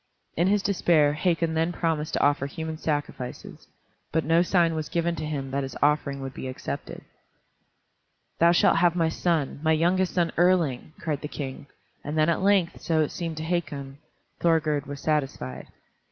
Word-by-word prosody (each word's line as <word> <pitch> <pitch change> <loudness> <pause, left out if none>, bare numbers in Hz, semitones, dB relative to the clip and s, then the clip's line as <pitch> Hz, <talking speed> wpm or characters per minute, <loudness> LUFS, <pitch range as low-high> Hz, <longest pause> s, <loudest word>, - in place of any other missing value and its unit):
In 170 +3 +2
his 200 0 +2
despair 165 -7 +3
Hakon 165 0 0
then 165 +2 +1
promised 160 -3 -1
to - - +1
offer 145 -1 +2
human 160 +2 -5
sacrifices, 145 -5 -4 0.4
but 160 0 0
no 165 +2 +4
sign 175 -2 +2
was 155 -1 -3
given 170 0 0
to 155 - -3
him 135 -3 -4
that 140 +1 0
his 135 -1 -6
offering 145 -1 +1
would 135 -1 -6
be 130 - -6
accepted. 130 - -6 1.4
"Thou 170 +1 +6
shalt 170 - +4
have 175 0 +3
my 165 -2 +2
son, 160 -4 -1
my 160 0 +3
youngest 175 +3 +1
son 170 -2 +2
Erling!" 165 -6 +2
cried 150 -4 -2
the 150 - -4
King, 140 -1 -6 0.4
and 150 +2 -4
then 155 +1 +4
at 170 - +1
length, 195 -3 +2
so 160 -1 +1
it 150 - 0
seemed 165 -3 -4
to 155 - -4
Hakon, 145 -5 -3 0.4
Thorgerd 155 -4 +1
was 140 0 -6
satisfied. 135 - -2
160 Hz, 175 wpm, -26 LUFS, 145-170 Hz, 1.4 s, Thou